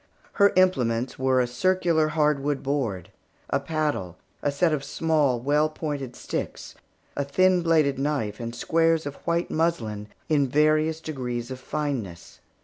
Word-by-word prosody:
Her 200 0 +5
implements 130 -11 +2
were 130 0 +2
a 125 - +3
circular 165 +5 +1
hardwood 150 -2 0
board, 125 -11 -2 0.4
a - - +2
paddle, 140 - -2 0.2
a 145 - 0
set 155 +3 +2
of 145 -2 -1
small, 150 -4 +1
well 145 +5 +2
pointed 145 -5 -5
sticks, - - -5 0.4
a 140 - 0
thin 185 +6 +3
bladed 155 -5 +2
knife, 135 -8 -1
and 115 0 -5
squares 165 +4 +2
of 145 -1 -6
white 170 +1 0
muslin 115 -11 -1 0.2
of 150 -3 +3
various 155 +3 +2
degrees 125 -5 -4
of 130 - -6
fineness. 130 - -4
145 Hz, 140 wpm, -25 LUFS, 125-160 Hz, 0.4 s, Her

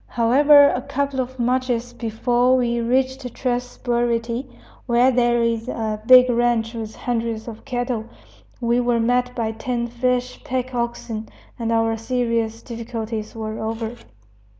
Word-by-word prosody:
However, 285 +5 +6
a 250 - -1
couple 280 0 -2
of 260 0 -3
marches 245 -1 0
before 245 +3 +1
we 240 -1 0
reached 260 +1 0
Tres 245 -1 -2
Burity, 235 +1 -1 0.4
where 245 +2 +4
there 240 -1 +2
is 230 0 -1
a 215 -3 -3
big 255 0 +9
ranch 240 -1 +1
with 220 -2 -6
hundreds 230 -2 -3
of 225 -2 -9
cattle, 245 -3 -2 0.5
we 240 0 +1
were 240 -1 +1
met 245 +2 +1
by 225 -2 -1
ten 235 +2 -3
fresh 250 +1 -2
pack 255 0 -3
oxen, 235 -2 -3 0.3
and 230 -1 -1
our 225 0 +2
serious 230 -1 -1
difficulties 225 -2 -5
were 220 -1 -5
over. 225 +1 -3
240 Hz, 140 wpm, -22 LUFS, 230-250 Hz, 0.5 s, big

